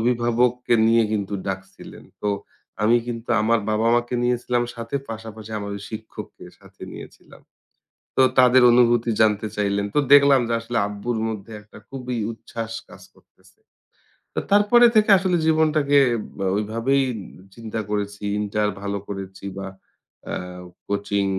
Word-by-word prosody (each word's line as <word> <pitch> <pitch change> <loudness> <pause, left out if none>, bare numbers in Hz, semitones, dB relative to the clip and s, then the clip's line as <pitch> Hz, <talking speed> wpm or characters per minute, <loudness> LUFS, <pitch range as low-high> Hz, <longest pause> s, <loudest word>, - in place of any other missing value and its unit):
অভিভাবককে 120 +1 +1
নিয়ে 115 +1 +4
কিন্তু 100 -1 -2
ডাকছিলেন। 95 0 -7 0.2
তো 105 - 0 0.5
আমি 115 +3 +4
কিন্তু 115 0 -6
আমার 115 +2 +3
বাবা-মাকে 120 +3 +1
নিয়েছিলাম 120 0 0
সাথে 115 +3 -4
পাশাপাশি 110 -1 -8
আমার 100 0 -6
ওই 100 - -9
শিক্ষককে 110 0 -9
সাথে - - -18
নিয়েছিলাম। - - -13 0.8
তো - - +5 0.2
তাদের 130 0 +6
অনুভূতি 120 -1 +3
জানতে 110 -1 +3
চাইলেন। 100 -1 0
তো - - +3
দেখলাম 140 -1 +7
যে - - -1
আসলে 115 +1 -3
আব্বুর 105 +3 -4
মধ্যে 110 0 -7
একটা 105 - -16
খুবই 125 -2 -5 0.2
উচ্ছ্বাস 115 0 -7 0.2
কাজ - - -14
করতেছে। - - -26 0.8
তো - - +1
তারপরে 210 +4 +6
থেকে 215 0 +4
আসলে 185 -1 +1
জীবনটাকে 155 -3 +3 0.4
ব - - -13 0.2
ওইভাবেই 115 +6 0 0.4
উ - - -16
চিন্তা 115 -1 -5
করেছি। 105 0 -3 0.2
ইন্টার 105 0 0
ভালো 100 0 -3
করেছি 95 -1 -7
বা 95 0 -5 0.6
অ্যা - - -4 0.5
কোচিং, 100 0 -1
115 Hz, 135 wpm, -22 LUFS, 105-125 Hz, 0.8 s, দেখলাম